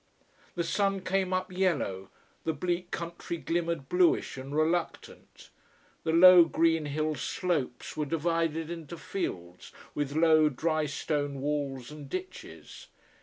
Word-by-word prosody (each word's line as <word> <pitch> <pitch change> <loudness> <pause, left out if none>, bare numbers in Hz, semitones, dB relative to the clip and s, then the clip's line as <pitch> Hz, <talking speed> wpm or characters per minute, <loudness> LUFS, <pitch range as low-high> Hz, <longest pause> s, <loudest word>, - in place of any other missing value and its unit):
The 170 - 0
sun 195 +3 0
came 190 0 0
up 185 0 -1
yellow, 145 - -1 0.3
the 160 - 0
bleak 175 +3 -2
country 170 0 -5
glimmered 170 -4 -2
bluish 180 +1 +2
and 135 +2 -7
reluctant. 165 +2 -2 0.5
The 160 - 0
low, 175 +1 +9
green 165 -1 +2
hill 155 +2 -1
slopes 150 -5 -2
were 150 -1 -2
divided 165 0 -1
into 170 0 -7
fields, 90 - -5 0.2
with 145 -1 -3
low 155 -1 +5
drystone 150 -1 -1
walls 140 -2 -3
and 150 -2 -10
ditches. 370 0 -8
165 Hz, 125 wpm, -29 LUFS, 145-175 Hz, 0.5 s, low